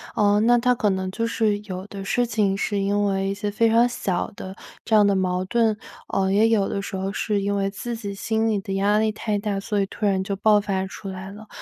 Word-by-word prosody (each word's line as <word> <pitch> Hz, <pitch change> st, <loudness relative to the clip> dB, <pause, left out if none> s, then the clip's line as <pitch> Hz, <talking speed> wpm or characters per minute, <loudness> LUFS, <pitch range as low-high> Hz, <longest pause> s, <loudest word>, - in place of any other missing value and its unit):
呃， 205 Hz, 0 st, +3 dB
那 240 Hz, +2 st, +5 dB
它 250 Hz, +1 st, +2 dB
可 210 Hz, -3 st, +1 dB
能 190 Hz, 0 st, -2 dB
就 230 Hz, +5 st, -2 dB
是 220 Hz, -2 st, +1 dB
有 190 Hz, -1 st, -6 dB
的 195 Hz, -1 st, -8 dB
事 245 Hz, +4 st, +1 dB
情 210 Hz, -4 st, +1 dB
是 205 Hz, +1 st, -1 dB
因 205 Hz, +1 st, +1 dB
为 195 Hz, -1 st, 0 dB
一 195 Hz, -, -1 dB
些 205 Hz, +1 st, -3 dB
非 230 Hz, +3 st, +2 dB
常 230 Hz, +2 st, +4 dB
小 190 Hz, -7 st, -2 dB
的 190 Hz, 0 st, -8 dB, 0.3 s
这 225 Hz, -, +2 dB
样 210 Hz, -1 st, +6 dB
的 200 Hz, -, +2 dB
矛 185 Hz, -1 st, 0 dB
盾， 225 Hz, +2 st, +2 dB, 0.3 s
呃， 190 Hz, 0 st, +1 dB
也 210 Hz, +3 st, +4 dB
有 205 Hz, -3 st, +2 dB
的 -, -, -2 dB
时 195 Hz, -, -5 dB
候 190 Hz, +1 st, -2 dB
是 205 Hz, 0 st, -1 dB
因 200 Hz, +1 st, -1 dB
为 195 Hz, 0 st, 0 dB
自 235 Hz, +4 st, -5 dB
己 205 Hz, -3 st, -5 dB
心 220 Hz, +3 st, -1 dB
里 215 Hz, -2 st, +1 dB
的 195 Hz, 0 st, -5 dB
压 200 Hz, +2 st, +2 dB
力 220 Hz, 0 st, +2 dB
太 210 Hz, -1 st, -2 dB
大， 200 Hz, -1 st, -2 dB
所 205 Hz, +1 st, -1 dB
以 195 Hz, -, -1 dB
突 210 Hz, -, -4 dB
然 190 Hz, -2 st, +2 dB
就 200 Hz, +1 st, -3 dB
爆 210 Hz, +1 st, +4 dB
发 190 Hz, -2 st, -1 dB
出 195 Hz, +1 st, -9 dB
来 190 Hz, 0 st, -7 dB
了。 215 Hz, +2 st, -12 dB
205 Hz, 275 characters per minute, -23 LUFS, 195-220 Hz, 0.3 s, 样